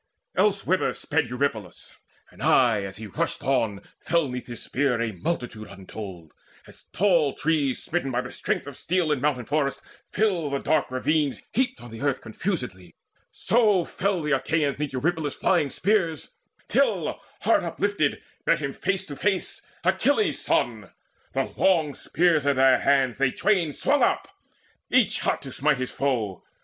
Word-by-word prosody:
Elsewhither 195 Hz, -2 st, +2 dB
sped 150 Hz, -5 st, -1 dB
Eurypylus; 120 Hz, -8 st, -3 dB, 0.4 s
and -, -, -15 dB
aye 120 Hz, -5 st, +4 dB
as 95 Hz, 0 st, -7 dB
he 110 Hz, -, -7 dB
rushed 100 Hz, -, -3 dB
on 115 Hz, -7 st, +1 dB, 0.2 s
Fell 170 Hz, -2 st, +1 dB
'neath 125 Hz, -1 st, -6 dB
his 120 Hz, -1 st, -6 dB
spear 130 Hz, -3 st, 0 dB
a 115 Hz, -1 st, -1 dB
multitude 110 Hz, -, -4 dB
untold. 95 Hz, -3 st, -9 dB, 0.3 s
As -, -, -15 dB
tall 170 Hz, -8 st, +2 dB
trees, 150 Hz, -4 st, 0 dB
smitten 165 Hz, -5 st, -1 dB
by 125 Hz, -1 st, 0 dB
the 125 Hz, -, -8 dB
strength -, -, -2 dB
of 145 Hz, -2 st, -8 dB
steel 175 Hz, 0 st, 0 dB
In 145 Hz, -4 st, 0 dB
mountain 130 Hz, -4 st, 0 dB
forest, 145 Hz, 0 st, 0 dB, 0.3 s
fill 190 Hz, -8 st, +1 dB
the 140 Hz, -, -1 dB
dark 155 Hz, +2 st, +1 dB
ravines, 145 Hz, +3 st, 0 dB
Heaped 255 Hz, 0 st, 0 dB
on 120 Hz, -1 st, -11 dB
the 115 Hz, -, -8 dB
earth 140 Hz, -2 st, +1 dB
confusedly, 110 Hz, -, -4 dB, 0.3 s
so 215 Hz, -6 st, +2 dB
fell 195 Hz, -3 st, -1 dB
The 150 Hz, -, -1 dB
Achaeans 145 Hz, 0 st, 0 dB
'neath 150 Hz, -2 st, -2 dB
Eurypylus' 150 Hz, +2 st, -1 dB
flying 145 Hz, -, +2 dB
spears 180 Hz, -2 st, 0 dB, 0.4 s
Till -, -, +1 dB, 0.2 s
heart -, -, +3 dB
uplifted 200 Hz, -8 st, -1 dB, 0.2 s
met -, -, +5 dB
him 140 Hz, -2 st, -3 dB
face 195 Hz, 0 st, -1 dB
to 145 Hz, -, -7 dB
face 195 Hz, +3 st, -1 dB, 0.2 s
Achilles' 220 Hz, -, +2 dB
son. -, -, 0 dB, 0.4 s
The -, -, -1 dB
long 160 Hz, -6 st, +3 dB
spears 160 Hz, -3 st, +1 dB
in 140 Hz, -, +3 dB
their 130 Hz, 0 st, +5 dB
hands 135 Hz, -3 st, +2 dB
They 135 Hz, -2 st, +3 dB
twain 175 Hz, +1 st, +1 dB
swung 280 Hz, -, +1 dB
up, -, -, +2 dB, 0.6 s
each 245 Hz, -6 st, +3 dB
hot -, -, -1 dB
to 135 Hz, -, -7 dB
smite 140 Hz, +2 st, +2 dB
his 130 Hz, 0 st, -3 dB
foe. 115 Hz, -9 st, -1 dB
145 Hz, 160 wpm, -25 LUFS, 125-175 Hz, 0.6 s, met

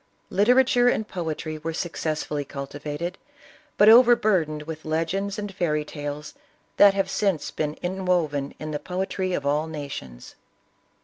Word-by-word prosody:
Literature 245 Hz, +3 st, +4 dB
and 220 Hz, -3 st, +1 dB
poetry 155 Hz, -2 st, -4 dB
were 160 Hz, +1 st, -4 dB
successfully 155 Hz, -3 st, -2 dB
cultivated, 145 Hz, +5 st, -6 dB, 0.6 s
but 205 Hz, -, +6 dB
overbur 220 Hz, -7 st, +6 dB
dened 150 Hz, -1 st, -6 dB
with 160 Hz, 0 st, -7 dB
legends 175 Hz, +6 st, -1 dB
and 205 Hz, -1 st, -5 dB
fairy 150 Hz, -5 st, 0 dB
tales 145 Hz, 0 st, -6 dB, 0.4 s
that 200 Hz, -1 st, +7 dB
have 195 Hz, -1 st, +1 dB
since 195 Hz, -5 st, -1 dB
been 150 Hz, 0 st, -2 dB
inwoven 175 Hz, -6 st, -1 dB
in 155 Hz, 0 st, -6 dB
the 150 Hz, -, -2 dB
poetry 185 Hz, +1 st, -3 dB
of 140 Hz, -, -2 dB
all 150 Hz, +2 st, +1 dB
nations. 140 Hz, -, -7 dB
160 Hz, 135 wpm, -25 LUFS, 150-195 Hz, 0.6 s, that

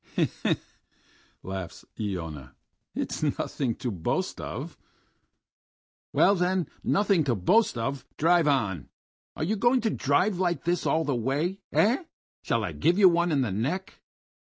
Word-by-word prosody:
"He -, -, +3 dB
he!... -, -, -7 dB
he -, -, +1 dB
he!..." -, -, -21 dB, 0.8 s
laughs 95 Hz, -2 st, -6 dB
Iona. 80 Hz, -, -5 dB, 0.4 s
"It's -, -, -3 dB
nothing 125 Hz, -5 st, -1 dB
to 125 Hz, -2 st, -3 dB
boast 90 Hz, -5 st, -2 dB
of!" -, -, -6 dB, 1.4 s
"Well, 195 Hz, -, +5 dB
then, 180 Hz, -3 st, +1 dB, 0.2 s
nothing 200 Hz, -4 st, +3 dB
to 125 Hz, -4 st, +1 dB
boast 190 Hz, -, +3 dB
of, 135 Hz, +4 st, -3 dB
drive 170 Hz, 0 st, +4 dB
on! 105 Hz, -, 0 dB, 0.5 s
Are -, -, -3 dB
you 200 Hz, +7 st, 0 dB
going 240 Hz, +4 st, +3 dB
to 225 Hz, -, 0 dB
drive 175 Hz, +7 st, +1 dB
like 175 Hz, -2 st, 0 dB
this 175 Hz, +1 st, 0 dB
all 160 Hz, -, +2 dB
the 145 Hz, -, 0 dB
way? 140 Hz, -, -1 dB
Eh? 240 Hz, -, +3 dB, 0.4 s
Shall -, -, 0 dB
I -, -, -2 dB
give 170 Hz, +3 st, +2 dB
you 195 Hz, -3 st, +8 dB
one 170 Hz, 0 st, +2 dB
in 145 Hz, -3 st, +2 dB
the 120 Hz, -6 st, -1 dB
neck?" 140 Hz, -, -3 dB
155 Hz, 155 wpm, -27 LUFS, 115-185 Hz, 1.4 s, you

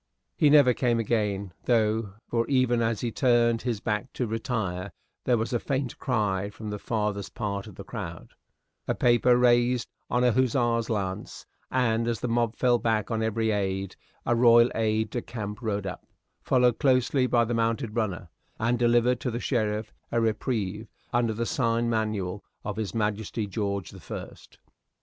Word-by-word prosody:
He 150 Hz, -, +4 dB
never 140 Hz, -4 st, +6 dB
came 120 Hz, -1 st, +1 dB
again, 105 Hz, -4 st, -1 dB
though, 110 Hz, -3 st, +1 dB
for, 115 Hz, -1 st, 0 dB
even 130 Hz, -3 st, +2 dB
as 115 Hz, -2 st, 0 dB
he 120 Hz, -, -1 dB
turned 120 Hz, -2 st, +3 dB
his 120 Hz, -4 st, -2 dB
back 105 Hz, +3 st, -2 dB
to 125 Hz, -, -1 dB
retire, 110 Hz, -5 st, -3 dB, 0.3 s
there 125 Hz, -2 st, +3 dB
was 115 Hz, +3 st, -2 dB
a 120 Hz, -, +2 dB
faint 135 Hz, -2 st, -3 dB
cry 100 Hz, -6 st, 0 dB
from 105 Hz, +1 st, -7 dB
the 105 Hz, -, -4 dB
farthest 105 Hz, -3 st, -2 dB
part 100 Hz, -2 st, -3 dB
of 105 Hz, -, -11 dB
the -, -, -8 dB
crowd, -, -, -7 dB, 0.6 s
a -, -, 0 dB
paper 120 Hz, 0 st, +4 dB
raised 120 Hz, 0 st, +3 dB, 0.2 s
on 125 Hz, 0 st, +1 dB
a 125 Hz, -, +5 dB
hussar's 120 Hz, -2 st, +1 dB
lance, 95 Hz, -4 st, -3 dB, 0.2 s
and 115 Hz, -3 st, +1 dB
as 115 Hz, -2 st, -1 dB
the -, -, -2 dB
mob 115 Hz, -1 st, 0 dB
fell 120 Hz, -2 st, +3 dB
back 110 Hz, -1 st, 0 dB
on 110 Hz, -1 st, 0 dB
every 110 Hz, 0 st, 0 dB
aide, 95 Hz, -2 st, -2 dB, 0.3 s
a 120 Hz, -, +2 dB
royal 120 Hz, 0 st, +6 dB
aide 110 Hz, -1 st, 0 dB
de 120 Hz, -, -2 dB
camp 105 Hz, -2 st, -6 dB
rode 105 Hz, -4 st, -2 dB
up, 95 Hz, -, -6 dB, 0.3 s
followed 125 Hz, -3 st, +3 dB
closely 130 Hz, 0 st, +3 dB
by 120 Hz, -2 st, +3 dB
the 120 Hz, -, -2 dB
mounted 115 Hz, 0 st, -1 dB
runner, 100 Hz, -6 st, -2 dB, 0.3 s
and 120 Hz, +2 st, +1 dB
delivered 120 Hz, +1 st, +3 dB
to 125 Hz, -, -2 dB
the 120 Hz, 0 st, -3 dB
sheriff 110 Hz, -4 st, -1 dB, 0.2 s
a 120 Hz, -, +2 dB
reprieve 110 Hz, -2 st, -1 dB, 0.3 s
under 120 Hz, -1 st, +2 dB
the 115 Hz, +2 st, -1 dB
sign 115 Hz, -5 st, 0 dB
manual 105 Hz, -4 st, -1 dB, 0.2 s
of 105 Hz, -1 st, -4 dB
His 110 Hz, 0 st, -3 dB
Majesty 105 Hz, 0 st, -1 dB
George 100 Hz, -1 st, -3 dB
the 95 Hz, -, -11 dB
First. 80 Hz, -, -9 dB
115 Hz, 175 wpm, -27 LUFS, 105-120 Hz, 0.6 s, never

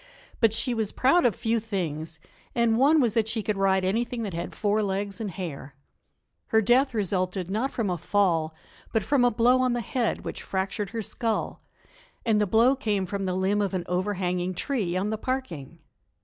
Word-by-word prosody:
But 225 Hz, -2 st, +4 dB
she 235 Hz, +3 st, 0 dB
was 220 Hz, -3 st, -1 dB
proud 270 Hz, +3 st, +4 dB
of 220 Hz, -, -1 dB
few 230 Hz, 0 st, 0 dB
things, 165 Hz, -7 st, -4 dB, 0.4 s
and 235 Hz, -2 st, +3 dB
one 300 Hz, +4 st, +5 dB
was 240 Hz, -6 st, +2 dB
that 225 Hz, -2 st, +1 dB
she 225 Hz, -1 st, -2 dB
could 210 Hz, -, -1 dB
ride 190 Hz, -1 st, +2 dB
anything 230 Hz, +4 st, -1 dB
that 200 Hz, -4 st, -4 dB
had 170 Hz, -, -5 dB
four 210 Hz, 0 st, +1 dB
legs 200 Hz, +2 st, -2 dB
and 215 Hz, -, -2 dB
hair. 160 Hz, -7 st, -7 dB, 0.7 s
Her 220 Hz, -, +3 dB
death 245 Hz, +4 st, +3 dB
resulted 185 Hz, -2 st, -1 dB
not 225 Hz, +7 st, 0 dB
from 230 Hz, -6 st, -2 dB
a 175 Hz, -, -2 dB
fall, 165 Hz, -5 st, +1 dB, 0.4 s
but 225 Hz, -3 st, +1 dB
from 275 Hz, +1 st, +2 dB
a 245 Hz, -, +5 dB
blow 245 Hz, +2 st, +3 dB
on 255 Hz, -1 st, +2 dB
the 240 Hz, -, 0 dB
head 235 Hz, +1 st, -2 dB
which -, -, -5 dB
fractured 195 Hz, +1 st, -2 dB
her 225 Hz, -1 st, -4 dB
skull, 225 Hz, +1 st, -2 dB, 0.6 s
and 215 Hz, -2 st, +3 dB
the 210 Hz, -, +2 dB
blow 230 Hz, +7 st, +4 dB
came 210 Hz, -7 st, -1 dB
from 195 Hz, +1 st, -3 dB
the 185 Hz, -1 st, -1 dB
limb 195 Hz, +2 st, +1 dB
of 200 Hz, -1 st, -1 dB
an 180 Hz, -, -1 dB
overhanging 180 Hz, -1 st, -1 dB
tree 200 Hz, -7 st, -1 dB
on 200 Hz, +3 st, -1 dB
the 220 Hz, -, -3 dB
parking. 170 Hz, -, -4 dB
210 Hz, 195 wpm, -26 LUFS, 185-235 Hz, 0.7 s, one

